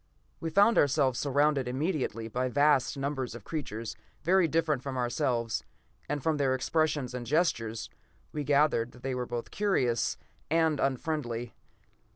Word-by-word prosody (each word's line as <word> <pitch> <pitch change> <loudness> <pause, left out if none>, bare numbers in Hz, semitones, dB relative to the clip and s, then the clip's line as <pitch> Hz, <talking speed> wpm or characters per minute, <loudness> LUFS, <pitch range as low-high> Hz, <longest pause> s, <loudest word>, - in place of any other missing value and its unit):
We 165 - -3
found 205 +7 +5
ourselves 135 -3 +3
surrounded 145 -1 +2
immediately 130 - -2
by 125 +3 -1
vast 145 +1 +3
numbers 135 -3 -3
of 120 - -9
creatures 115 -7 -5 0.3
very 185 0 +4
different 155 -3 +1
from 135 -1 -4
ourselves, 120 -2 0 0.5
and 145 -1 -2
from 160 -2 +1
their 135 -2 +2
expressions 145 -1 0
and 125 -1 -4
gestures, 115 -6 0 0.4
we 150 - -3
gathered 140 -5 +2
that 125 - -16
they 135 0 -1
were 125 -1 -3
both 120 -1 -5
curious 135 - +1 0.3
and 160 -2 +2
unfriendly. 125 -4 -2
135 Hz, 145 wpm, -29 LUFS, 125-155 Hz, 0.5 s, found